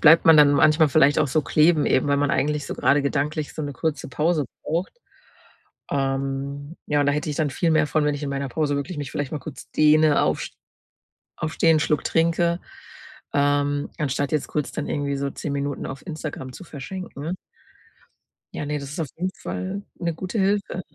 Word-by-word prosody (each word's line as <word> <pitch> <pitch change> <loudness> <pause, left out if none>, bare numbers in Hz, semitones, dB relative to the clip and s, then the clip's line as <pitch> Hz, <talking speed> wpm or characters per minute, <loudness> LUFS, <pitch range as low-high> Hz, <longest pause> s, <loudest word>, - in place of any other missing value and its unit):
bleibt 165 +1 +7
man 160 -1 +8
dann 145 -1 +7
manchmal 155 +1 +5
vielleicht 145 +1 +4
auch 150 - +2
so 155 - +2
kleben 155 0 +3
eben, 130 - +2
weil 140 - +3
man 145 0 +1
eigentlich 150 0 0
so - - -4
grade 145 - +3
gedanklich 145 +2 -1
so 155 - -4
'ne 145 -1 -4
kurze 155 +1 -3
Pause 155 +2 +1 0.2
braucht. 170 +4 -2 1.0
Ähm, 140 +2 -2
ja, 145 -1 +1
und 145 - +2
da 145 - +3
hätte 150 +1 -2
ich 145 - -4
dann 155 -3 +1
viel 165 +4 0
mehr 155 -1 +3
von, 155 0 +1
wenn 150 - +1
ich 145 - -6
in 140 - -3
meiner 140 0 -2
Pause 145 +2 0
wirklich 145 +3 -4
mich 145 -2 -4
vielleicht 145 -2 -3
mal 155 - -2
kurz 145 -1 -10
dehne, 155 0 +4
aufs - - -1 0.9
aufstehen, 160 +1 +2
'n 155 - +1
Schluck 150 -1 +1
trinke, 170 +1 +2 0.8
ähm, 145 0 +1
anstatt 140 0 -1
jetzt 150 - 0
kurz 150 -2 -2
dann 150 - -4
irgendwie 140 -1 -1
so 140 0 -2
10 145 - -5
Minuten 140 0 -3
auf 135 0 -8
Instagram 150 -5 -6
zu 185 - -10
verschenken. 170 +1 -6 1.2
Ja, - - -4
ne, 150 0 -2
das 140 - -7
ist 150 - -6
auf 155 - -2
jeden 185 +2 -1
Fall 190 +2 -5
'ne 170 -2 -2
gute 185 +6 -4
Hilfe. 195 -1 0
150 Hz, 200 wpm, -24 LUFS, 140-160 Hz, 1.2 s, man